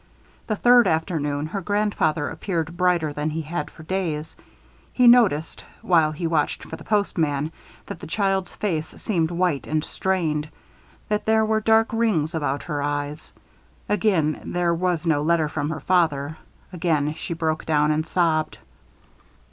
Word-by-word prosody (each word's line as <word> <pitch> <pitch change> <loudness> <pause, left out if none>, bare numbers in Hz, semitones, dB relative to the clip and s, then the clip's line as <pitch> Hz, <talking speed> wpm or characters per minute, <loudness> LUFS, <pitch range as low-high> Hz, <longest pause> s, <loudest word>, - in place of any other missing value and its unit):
The 215 - 0
third 245 +2 +5
afternoon, 155 -3 -1
her 195 +5 -4
grandfather 195 -6 0
appeared 165 -1 -3
brighter 175 -4 +1
than 150 +1 -2
he 160 +1 -3
had 170 +4 -4
for 160 - -14
days. 160 -3 -3 0.6
He 250 - +3
noticed, 210 -11 +4 0.2
while 160 -4 +3
she 165 +3 -4
watched 160 -3 0
for - - -7
the - - -12
postman, 160 -8 0 0.3
that - - -7
the - - -9
child's 195 0 -1
face 165 -7 -2
seemed 170 -7 0
white 170 -8 0
and 155 0 0
strained, 160 -7 -1 0.6
that 210 0 -1
there 220 0 +4
were 220 0 +1
dark 220 +1 +4
rings 200 -9 +1
about 145 -3 -2
her 145 -1 -3
eyes. 145 +1 -3 0.6
Again 185 -7 +1
there 175 -1 0
was 175 -1 -1
no 160 -3 +2
letter 160 0 +2
from 150 0 -3
her 155 -1 -4
father. 155 -4 +1 0.4
Again 155 -4 0
she 165 +1 -5
broke 160 -1 -1
down 150 -1 +3
and 155 +1 -1
sobbed. 160 -3 +1
165 Hz, 155 wpm, -23 LUFS, 150-185 Hz, 0.6 s, third